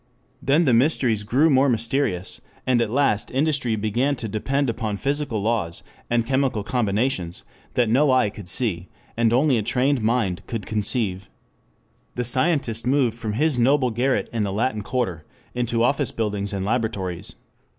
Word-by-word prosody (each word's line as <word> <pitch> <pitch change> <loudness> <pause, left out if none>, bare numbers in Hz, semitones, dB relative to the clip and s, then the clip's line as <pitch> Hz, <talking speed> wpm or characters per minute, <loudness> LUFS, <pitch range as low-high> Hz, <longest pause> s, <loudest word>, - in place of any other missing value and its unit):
Then 150 +6 +3
the 130 - +3
mysteries 120 -3 +2
grew 130 +10 +2
more 135 +1 +4
mysterious, 115 -5 -1 0.2
and 125 -2 +2
at 115 - 0
last 125 -4 +1
industry 135 -4 0
began 120 +7 0
to 115 -3 -5
depend 135 +7 -1
upon 110 -3 -2
physical 140 -5 -2
laws 105 -7 -1 0.3
and 120 -1 +1
chemical 130 -4 0
combinations 105 -5 -1 0.3
that 120 -2 +3
no 135 +6 +3
eye 125 -6 +3
could 100 -3 -9
see, 95 -6 0 0.3
and 115 -1 +2
only 130 0 +3
a - - 0
trained 125 +4 +1
mind 110 -5 0
could 115 -4 -4
conceive. 105 -3 -2 0.9
The 125 - -1
scientist 125 -2 +2
moved 130 -4 +2
from 115 -3 -4
his 145 +2 +1
noble 130 +1 +3
garret 125 +4 0
in 115 - -1
the 100 -2 -1
Latin 110 +2 -1
Quarter 100 -9 -2 0.3
into 120 -1 0
office 140 +1 +1
buildings 105 -2 -2
and 95 -2 -3
laboratories. 100 -6 -2
120 Hz, 160 wpm, -23 LUFS, 105-130 Hz, 0.9 s, more